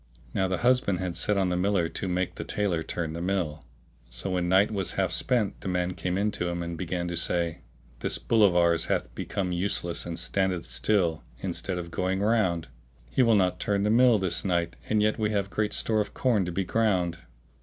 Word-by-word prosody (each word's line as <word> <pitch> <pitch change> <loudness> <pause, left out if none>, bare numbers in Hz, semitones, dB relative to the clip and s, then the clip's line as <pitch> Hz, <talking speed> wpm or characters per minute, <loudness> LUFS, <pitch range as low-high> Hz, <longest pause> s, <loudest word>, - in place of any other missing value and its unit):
Now 95 - +1
the 95 0 -1
husband 125 -7 +3
had 90 -1 -3
set 105 -1 +1
on 95 -2 +2
the 90 - 0
miller 90 -1 +1
to 85 +4 -4
make 90 0 -1
the - - -6
tailor 95 -6 -1
turn 80 0 -3
the 85 - -5
mill: 85 -5 -2 0.4
so - - -5
when 90 -1 0
night 95 +4 +4
was 100 -4 -2
half - - 0
spent 120 -6 0
the - - -6
man 90 0 0
came 90 0 -2
in 105 +2 +1
to 90 - -3
him 85 0 -2
and 85 0 -4
began 85 +1 -3
to 85 - -3
say, 85 -1 0 0.4
"This - - -1
bull 115 -2 +2
of 95 -4 +5
ours 85 -1 +3
hath - - -1
be - - -5
come 95 -2 -2
useless 85 -1 -2
and 85 -1 -4
standeth 90 0 -1
still 90 -7 0
instead 95 -2 -3
of 85 -1 -6
going 95 +2 -1
round: 100 - +1 0.4
he - - +2
will 115 -3 +5
not 95 -3 +2
turn 100 -1 0
the 105 - +2
mill 120 0 +6
this 95 -3 0
night, 85 -3 0
and 105 -1 +3
yet 110 +1 +1
we 105 -1 +1
have 100 -2 -1
great 105 -1 0
store 110 -1 +2
of 105 - -6
corn 115 -7 +2
to 90 - -3
be 95 +3 -1
ground. 90 -5 +1
95 Hz, 220 wpm, -27 LUFS, 85-105 Hz, 0.4 s, mill